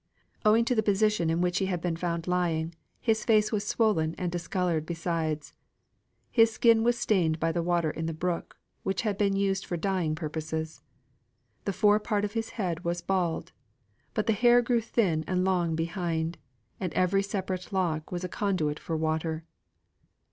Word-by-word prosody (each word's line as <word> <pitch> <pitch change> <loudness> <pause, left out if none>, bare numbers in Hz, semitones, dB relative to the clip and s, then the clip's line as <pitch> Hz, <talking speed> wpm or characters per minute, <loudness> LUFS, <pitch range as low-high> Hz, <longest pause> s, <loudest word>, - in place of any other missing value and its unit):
Owing 220 +2 +5
to 250 - +2
the 220 - +3
position 210 -4 +2
in 165 +1 +1
which 180 0 +1
he 190 - 0
had 180 -2 -1
been 170 -1 -1
found 170 -1 -2
lying, 170 -2 0 0.3
his 220 -2 +1
face 215 -2 +3
was 205 -2 -1
swollen 185 -10 +1
and 180 -1 -2
discoloured; 175 -2 -1
besides, 165 -2 -2 0.8
his 225 -2 +5
skin 225 0 +4
was 240 0 +2
stained 175 -9 +1
by 165 +1 +1
the 170 +1 -1
water 170 -2 +1
in 160 +1 -4
the 165 - -2
brook, 175 +1 -3 0.2
which 195 - -1
had 210 -3 0
been 195 0 +1
used 195 -1 +1
for 175 - -3
dyeing 175 -3 0
purposes. 160 0 -4 0.8
The 200 - -1
fore 210 +2 +4
part 210 -1 0
of 205 - -5
his 225 -1 -2
head 175 -5 -2
was 175 0 -2
bald; 180 -4 -1 0.6
but 215 - +1
the 225 - +3
hair 240 +3 +5
grew 235 -1 +2
thin 190 -8 +1
and 185 0 +1
long 175 -4 +1
behind, 165 -1 -2 0.4
and 185 -3 -2
every 185 +2 +2
separate 190 -2 -4
lock 170 -5 -1
was 175 0 -3
a - - -1
conduit 175 -6 -1
for 165 - -3
water. 160 0 -1
180 Hz, 175 wpm, -28 LUFS, 165-205 Hz, 0.8 s, Owing